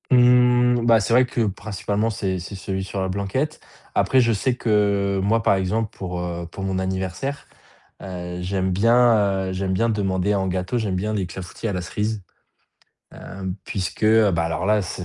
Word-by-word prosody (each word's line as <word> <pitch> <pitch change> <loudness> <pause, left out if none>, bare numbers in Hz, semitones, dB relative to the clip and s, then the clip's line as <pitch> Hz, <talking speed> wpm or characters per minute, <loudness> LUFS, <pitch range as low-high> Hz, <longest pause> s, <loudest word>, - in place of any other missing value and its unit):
Mmh, 125 -1 +5
bah, 115 -1 +6
c'est 105 +3 0
vrai 125 +2 +6
que 125 -1 -2
principalement 105 +1 -2
c'est 95 -3 -2
c'est 90 +3 -8
celui 95 0 -4
sur 100 +1 -5
la 95 - 0
blanquette. 100 +11 -2 0.3
Après 130 - +3
je 115 -2 +3
sais 120 +4 0
que 100 -4 +1
moi 110 +3 +2
par 100 - +3
exemple, 105 +4 -1
pour, 90 -2 -5
heu, 85 -1 -4
pour 95 - -7
mon 95 -1 -1
anniversaire, 95 +9 -3 0.5
heu, 90 -2 -6
j'aime 95 +1 -1
bien, 105 -2 +3
heu, - - -3
j'aime 95 0 -2
bien 115 +5 +1
demander 100 -2 0
en 95 -1 0
gâteau, 95 +5 -2
j'aime 105 -5 -1
bien 105 +4 -2
les 100 -4 -1
clafoutis 95 +5 -7
à - - -2
la 90 - -2
cerise, 105 +3 -3 0.9
hem, 95 -1 -6
puisque, 95 +1 -3
heu, 110 -1 +5
bah, 85 -2 0
alors 80 +3 -2
là 105 0 +3
c'est 90 0 -5
100 Hz, 190 wpm, -22 LUFS, 95-115 Hz, 0.9 s, bah